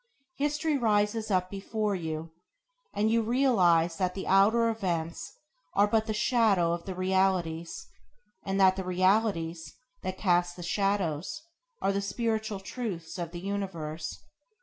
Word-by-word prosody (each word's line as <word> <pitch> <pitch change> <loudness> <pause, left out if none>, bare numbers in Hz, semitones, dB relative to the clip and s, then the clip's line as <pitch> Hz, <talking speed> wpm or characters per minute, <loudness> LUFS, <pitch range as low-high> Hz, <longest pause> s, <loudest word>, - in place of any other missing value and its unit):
History 295 +1 0
rises 215 -1 +1
up 185 -2 +1
before 210 +1 -2
you, 160 -2 -4 0.6
and 215 +2 +1
you 230 0 +3
realize 190 -9 +3
that 185 -2 -1
the 195 - -4
outer 215 +5 +4
events 175 -7 -2 0.4
are 200 - +5
but 220 +1 +1
the - - -1
shadow 210 -7 +3
of 170 0 -3
the 190 - -5
realities, 185 -3 0 0.6
and 195 0 -1
that 190 -1 +5
the 190 - -2
realities 180 -3 0 0.3
that 185 0 -4
cast 175 -2 +2
the 175 - -8
shadows 190 - -1 0.4
are 195 - +3
the 200 - 0
spiritual 220 0 -2
truths 190 -5 -5
of 170 -2 -3
the 175 0 -8
universe. 170 -6 -4
195 Hz, 140 wpm, -29 LUFS, 175-215 Hz, 0.6 s, are